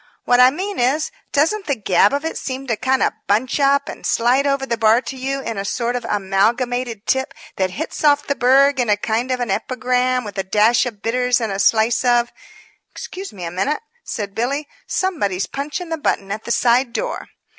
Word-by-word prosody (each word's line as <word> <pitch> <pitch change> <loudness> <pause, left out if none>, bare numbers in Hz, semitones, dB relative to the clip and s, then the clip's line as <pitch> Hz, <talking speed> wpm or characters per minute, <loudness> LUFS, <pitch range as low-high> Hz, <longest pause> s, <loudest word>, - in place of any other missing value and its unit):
What 245 0 +4
I 250 0 +8
mean 380 +8 -4
is, 275 +6 +1 0.2
doesn't 345 +8 +1
the 285 - +1
gab 200 -6 +3
of 285 +2 -2
it 325 - -3
seem 265 0 -5
to 235 -4 0
kind 260 +4 +1
of - - +1
bunch 230 +7 +1
up 280 0 +3
and - - -8
slide 255 +4 +2
over 275 -1 0
the 235 - -1
bar 225 0 +4
to 265 - -7
you 270 +1 -3
in 225 -6 -4
a - - -2
sort 235 +4 -2
of 245 -2 -3
amalgamated 225 +3 0
tip 265 0 0 0.2
that 190 -1 +1
hits 310 - -5
off 290 -1 +4
the 280 - 0
burg 270 +2 +4
in 240 -3 +1
a 205 - +3
kind 225 +4 -1
of 255 -1 -1
an 240 -5 -2
epigram 250 +3 0
with 205 -2 -6
a - - 0
dash 215 +6 +3
of 215 -4 -9
bitters 250 +2 +1
and 225 -3 -2
a 195 - -3
slice 225 +3 +3
of 240 -1 +2 0.3
" - - -31
"Excuse 385 +1 -8
me 185 -3 -9
a 165 - -4
minute," 235 - -1 0.2
said 205 -5 -5
Billy, 275 +7 -2 0.2
"somebody's 205 - -1
punching 300 +5 -5
the 325 -1 -3
button 195 -8 -1
at 215 +2 -5
the 235 - -3
side 240 +1 +2
door." - - -3
250 Hz, 215 wpm, -20 LUFS, 220-275 Hz, 0.3 s, I